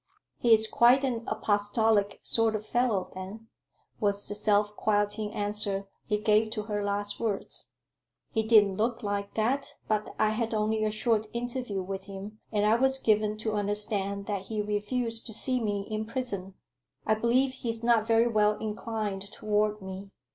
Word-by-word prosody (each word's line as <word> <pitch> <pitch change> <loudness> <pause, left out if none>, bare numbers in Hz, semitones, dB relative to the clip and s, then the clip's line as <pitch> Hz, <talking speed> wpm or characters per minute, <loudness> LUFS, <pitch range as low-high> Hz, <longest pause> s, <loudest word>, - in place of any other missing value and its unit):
"He's 220 -2 +5
quite 245 +5 +5
an 240 -4 -1
apostolic 205 0 +1
sort 225 -1 +1
of 215 0 -4
fellow, 230 -7 0
then," 200 +5 -8 0.5
was 200 -1 0
the - - -2
self 210 0 +2
quieting 205 0 0
answer 205 -1 0 0.2
he 210 - +1
gave 215 +1 +3
to 215 - -3
her 210 -1 -2
last 205 0 -2
words. 215 -4 -3 0.6
"He 220 - +1
didn't 210 -3 +4
look 230 +2 -1
like 200 -1 -3
that; 270 +6 0
but 215 -1 -1
I 215 - +3
had 225 +1 -1
only 215 +1 +1
a 215 - +2
short 215 0 0
interview 240 -4 -3
with 190 +1 -5
him, 200 +2 -8
and 210 -1 +1
I 220 +2 +4
was 265 +2 +3
given 215 -3 +1
to 220 - 0
understand 205 -1 0
that 200 -2 -3
he 220 -1 -3
refused 225 +3 -1
to 220 - -7
see 255 +4 0
me 205 -3 -1
in 215 0 -3
prison. 205 -7 -3 0.5
I 220 - +3
believe 240 +4 +2
he's 230 -3 -3
not 230 -2 +3
very 230 +1 +4
well 210 -2 +2
inclined 210 -2 -4
toward 210 -1 0
me. 190 +1 -7
215 Hz, 165 wpm, -28 LUFS, 205-225 Hz, 0.6 s, He's